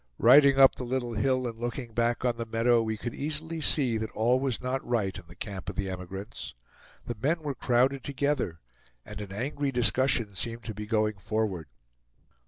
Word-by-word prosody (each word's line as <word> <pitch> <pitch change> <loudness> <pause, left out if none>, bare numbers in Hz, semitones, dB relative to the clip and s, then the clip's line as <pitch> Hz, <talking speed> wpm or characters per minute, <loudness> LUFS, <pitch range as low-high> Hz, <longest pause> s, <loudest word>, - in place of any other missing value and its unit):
Riding 135 +2 +7
up 135 -1 +8
the - - -7
little 120 -1 -2
hill 130 +4 +1
and 115 -2 -5
looking 120 0 -4
back 120 +2 0
on 120 -1 +1
the 115 - -3
meadow, 115 +1 +3
we 110 -1 -2
could 120 +2 -5
easily 155 +2 -4
see 130 -6 +2
that 110 0 -3
all 120 +3 +2
was 130 -4 -1
not 130 +1 -2
right 110 -6 -1
in 95 - -9
the 85 - -14
camp 95 0 -6
of - - -6
the 95 -1 -2
emigrants. 95 - -7 0.5
The 120 -2 -4
men 160 +5 +1
were 145 -2 -2
crowded 130 +2 +1
together, 140 - -1 0.4
and 105 0 -8
an 100 -2 -7
angry 140 +6 -2
discussion 125 -3 +2
seemed 115 +4 -3
to 110 - -5
be 105 +1 -7
going 105 -2 0
forward. 105 -6 -2
120 Hz, 190 wpm, -28 LUFS, 105-135 Hz, 0.5 s, up